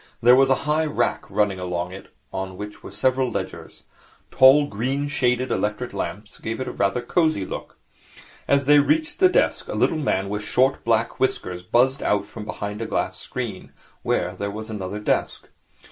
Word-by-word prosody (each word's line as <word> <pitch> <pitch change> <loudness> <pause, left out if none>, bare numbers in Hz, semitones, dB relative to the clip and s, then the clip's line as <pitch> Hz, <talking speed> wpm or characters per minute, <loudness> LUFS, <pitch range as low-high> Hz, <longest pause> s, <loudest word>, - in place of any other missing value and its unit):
There 125 +2 +7
was 135 +1 +4
a 135 - +5
high 155 +1 +1
rack 120 -5 -1
running 100 -3 +1
along 90 -1 -3
it, 95 +1 -10 0.3
on 95 -1 -4
which 105 0 -8
were - - -9
several 130 +5 +1
ledgers. - - -6 0.5
Tall, 135 +3 +7
green 135 +5 -2
shaded 125 -2 0
electric 105 +4 -2
lamps 105 +2 -5
gave 115 +2 -4
it - - -1
rather 100 +5 0
a - - -15
cosy 155 - +1
look. - - -7 0.7
As 140 -1 +3
they 145 +1 +7
reached 310 - +1
the 370 -1 +6
desk, - - +1
a - - -4
little 160 - +1
man 100 -9 0
with 105 +1 -3
short, 130 +4 +2
black 115 0 +1
whiskers 90 -8 -1
buzzed 125 +9 +2
out 100 -1 +1
from 105 +1 -9
behind 105 +1 -5
a 115 - -3
glass - - -2
screen, - - -6 0.3
where - - 0
there 100 - -4
was 110 +2 -7
another 100 -1 -4
desk. 105 - -1
115 Hz, 180 wpm, -23 LUFS, 100-135 Hz, 0.7 s, There